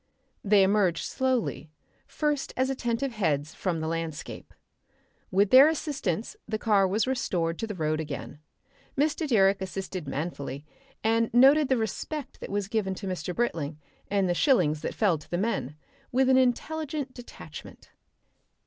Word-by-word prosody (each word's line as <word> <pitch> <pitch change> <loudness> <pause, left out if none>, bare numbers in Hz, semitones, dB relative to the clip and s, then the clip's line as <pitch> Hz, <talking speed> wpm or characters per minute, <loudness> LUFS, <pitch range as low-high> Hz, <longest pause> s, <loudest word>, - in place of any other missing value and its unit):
They 200 -1 +5
emerged 190 -3 +2
slowly, 245 - -1 0.4
first 295 -2 -1
as 260 +1 +1
attentive 255 +1 -1
heads, 155 -9 -1
from 175 -4 -2
the 160 - -2
landscape. 165 -2 -5 0.8
With 195 +1 +2
their 265 +3 +9
assistance 265 - -2
the 215 0 -2
car 205 -3 +3
was 205 +4 +1
restored 175 -10 -1
to 225 - -2
the 210 - -5
road 155 -2 -1
again. 150 -1 -6 0.6
Mr. 300 +2 +1
Direck 195 -6 +3
assisted 190 -3 -5
manfully, 140 -1 -4 0.4
and 225 +1 +2
noted 275 +3 +6
the 260 - +3
respect 260 +6 -4
that - - -7
was 200 -1 -2
given 200 -3 -1
to 195 - -7
Mr. 180 -2 -4
Britling 160 -10 -2 0.3
and 195 -2 +2
the 175 - +2
shillings 165 - +2
that - - -4
fell 190 -8 +2
to 145 - -17
the 175 - -1
men, 185 - -2 0.4
with 260 +1 +3
an 260 - +6
intelligent 280 +2 0
detachment. 245 -1 -11
205 Hz, 150 wpm, -27 LUFS, 170-255 Hz, 0.8 s, their